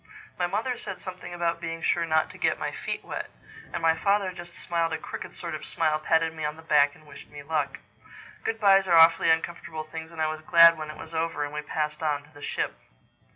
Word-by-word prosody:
My 175 - +2
mother 225 +7 -2
said - - -6
something 185 -1 -8
about 170 -1 -1
being 165 -1 -5
sure 170 -1 +1
not 160 0 +2
to - - -14
get - - +2
my - - -3
feet - - -5
wet; - - -5 0.4
and - - -4
my 165 0 +4
father 200 +1 +1
just 175 -1 -10
smiled 165 -1 -1
a - - 0
crooked - - -8
sort - - -5
of - - -5
smile, 155 -2 0
patted 160 +1 +2
me 160 -1 -6
on 150 0 -2
the 160 - -13
back 145 -2 +4
and 155 - -19
wished 150 - -13
me 145 -1 -10
luck. 145 -2 -1 0.7
Good 225 0 -2
byes 195 -2 +5
are 170 -2 +5
awfully 165 0 +7
uncomfortable 160 -1 -1
things 160 +1 -8
and 165 - -11
I 155 - +2
was 155 0 -3
glad 170 +1 +7
when 155 -1 -6
it 155 - -8
was 160 - -10
over 165 -2 -1
and 145 - -8
we 150 - -3
passed 150 0 -3
on 145 -2 0
to 145 - -21
the 145 - -14
ship. - - -2
160 Hz, 240 wpm, -27 LUFS, 155-170 Hz, 0.7 s, awfully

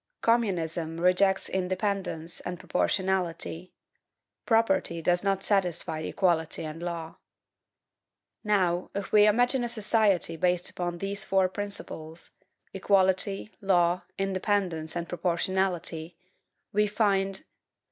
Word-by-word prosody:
Communism 170 -8 0
rejects 185 +2 +3
independence 185 -3 -2
and 180 -1 -6
proportionality; 185 -2 -1 0.8
property 225 -7 +2
does 175 +2 +1
not 195 -1 0
satisfy 175 -5 0
equality 160 -1 0
and 155 +2 -7
law. 170 -2 -5 1.3
Now, 185 -4 +1
if 200 0 -4
we 210 0 +6
imagine 245 +4 +3
a 240 - -2
society 210 -6 +1
based 180 +1 +1
upon 175 -1 -3
these 195 +2 -3
four 190 -1 +2
principles, 185 -5 -6 0.4
equality, 195 +1 +2
law, 180 -2 +3 0.2
independence, 190 -4 -1
and 170 -1 -3
proportionality, 175 -2 -1 0.6
we 210 +1 +3
find: 200 -2 +1
1. - - -11
185 Hz, 105 wpm, -28 LUFS, 170-200 Hz, 1.3 s, we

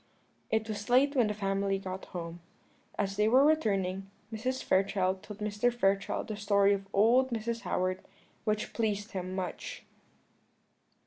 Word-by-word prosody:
It 220 0 0
was 210 0 -5
late 275 +4 +4
when 245 -5 +4
the 210 - -2
family 195 -1 0
got 190 0 -6
home. 170 -1 -6 0.6
As 200 -1 -1
they 210 +1 +3
were 260 +5 +6
returning, 195 -11 +1 0.2
Mrs. 255 +4 -2
Fairchild 190 -1 +1
told 210 0 -10
Mr. 210 +3 +1
Fairchild 195 -4 0
the 215 - -3
story 200 -1 +3
of 195 0 -3
old 240 +6 +4
Mrs. 230 0 -2
Howard, 185 0 -1 0.4
which 215 -1 -1
pleased 210 -2 -1
him 185 -1 -4
much. 185 -1 -5
205 Hz, 145 wpm, -30 LUFS, 195-225 Hz, 0.6 s, were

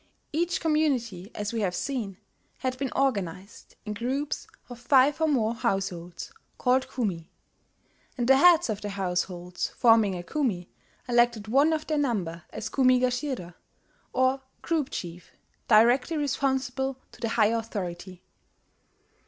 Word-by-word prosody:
Each 345 +3 0
community, 255 - 0
as 205 +1 -3
we 225 - -1
have 180 -3 0
seen, 225 -8 -3 0.4
had 255 -1 -2
been 270 -2 -2
organized 200 -7 -2
in 210 - -3
groups 265 +7 -3 0.2
of 245 -1 -10
five 270 +4 +4
or 320 - +4
more 235 -7 +1
households, 190 -6 -3 0.3
called 255 +1 +2
kumi; 185 -10 -3 0.9
and 240 -1 0
the 270 0 +7
heads 345 +3 +6
of 210 - -4
the 205 - -4
households 180 -2 -2
forming 225 -5 +4
a 175 - -5
kumi 195 - -2 0.4
elected 240 -3 +2
one 280 +8 +4
of 310 -1 -1
their 305 -2 0
number 185 - -1
as - - -5
kumi 255 -2 +3
gashira, 250 - -2 0.6
or 260 +1 +2 0.2
group 315 -5 0
chief, 175 0 -7 0.3
directly 245 +7 +4
responsible 265 -2 -1
to - - -17
the 230 - -1
higher 225 0 +3
authority. 185 -5 -6
240 Hz, 135 wpm, -27 LUFS, 195-270 Hz, 0.9 s, the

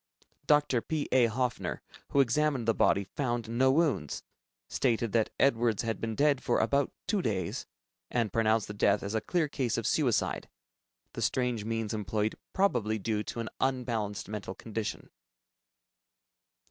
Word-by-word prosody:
Dr. 145 -5 +4
P. 155 +2 -2
A. 125 -2 +5
Hofner, 125 +2 -2 0.3
who 140 - +4
examined 135 -1 +1
the 115 - +4
body, 100 - +3
found 120 +1 -2
no 125 +3 +3
wounds, 135 - +1 0.4
stated 115 -3 0
that 110 0 +2
Edwards 120 -5 +3
had 115 -3 -2
been 115 -1 -2
dead 145 0 +3
for - - +1
about 140 -1 +2
two 200 +1 +1
days, 95 - -2 0.4
and 115 -5 0
pronounced 110 -1 +2
the 105 - -6
death 100 0 +2
as 100 +2 -3
a 110 - +1
clear 175 -4 0
case 130 -5 -1
of - - -2
suicide, - - +1 0.6
the - - -5
strange 125 -4 0
means 115 -1 -2
employed 105 0 -1 0.2
probably 120 - +1
due 105 0 -1
to 115 - -4
an 115 - -4
unbalanced 120 -6 -1
mental 105 -3 -5
condition. 110 0 -5
115 Hz, 150 wpm, -30 LUFS, 110-130 Hz, 0.6 s, A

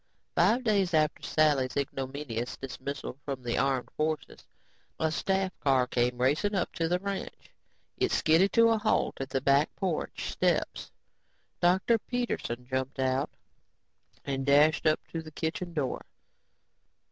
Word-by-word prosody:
Five 210 +9 +3
days 200 -6 +2
after 155 -1 +2
Sally's 145 -5 +2
ignominious 135 -3 -3
dismissal 135 +1 -6
from 135 -3 -5
the 120 -1 -1
armed 135 -1 0
forces, 155 0 -3 0.5
a 160 -1 +1
staff 190 +3 0
car 135 -3 +3
came 125 0 0
racing 145 +12 +1
up 185 - -1
to 165 -2 -1
the 175 +2 +2
ranch. 200 +1 -6 0.5
It - - +1
skidded 165 +5 +4
to 230 -1 +6
a 225 -1 +2
halt 215 -9 0
at 135 - -4
the 135 0 -1
back 140 +2 +3
porch 185 -5 -3
steps. - - 0 0.7
Dr. 190 +6 +3
Peterson 220 - -3
jumped 130 +1 -3
out 130 +1 0 1.0
and 135 -1 -2
dashed 150 +3 +4
up 155 - +3
to 165 - -4
the 160 - -10
kitchen 160 +3 -3
door. 150 -6 -2
150 Hz, 140 wpm, -29 LUFS, 135-180 Hz, 1.0 s, to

